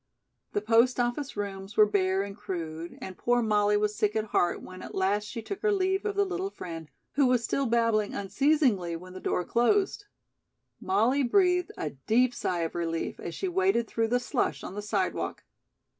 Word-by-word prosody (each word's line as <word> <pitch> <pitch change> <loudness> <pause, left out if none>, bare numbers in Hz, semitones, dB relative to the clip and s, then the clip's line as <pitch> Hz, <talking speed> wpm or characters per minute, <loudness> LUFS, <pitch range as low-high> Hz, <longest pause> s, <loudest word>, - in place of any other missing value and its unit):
The 205 - 0
post 230 +3 +4
office 245 +1 -1
rooms 195 0 -5
were 215 - +8
bare 195 -2 +1
and 200 0 -7
crude, 165 -3 -6
and 190 - -7
poor 240 +3 +1
Molly 210 -1 +3
was 210 0 0
sick 210 0 0
at 220 -1 0
heart 175 -4 +1
when 185 0 -10
at - - -8
last 200 +2 +1
she 225 +2 -6
took 395 - -5
her 430 - +2
leave 385 0 +1
of 415 -1 -1
the 405 0 +3
little 375 +1 -3
friend, 165 - -8 0.2
who 280 -1 +3
was 250 -2 +2
still 275 +3 0
babbling 230 -3 +1
unceasingly 205 - +1
when 180 +2 -9
the 185 - -7
door 180 - -1
closed. 385 - +1 0.7
Molly 280 - +2
breathed 360 +6 +3
a 150 - -3
deep 230 - +1
sigh 180 -7 -2
of 165 - -2
relief 165 -1 -3
as 170 - -6
she 385 - -2
waded 375 -10 +2
through 225 +1 0
the 245 +2 +2
slush 245 - -1
on - - -6
the 205 - -4
sidewalk. 205 - -2
220 Hz, 190 wpm, -28 LUFS, 190-275 Hz, 0.7 s, were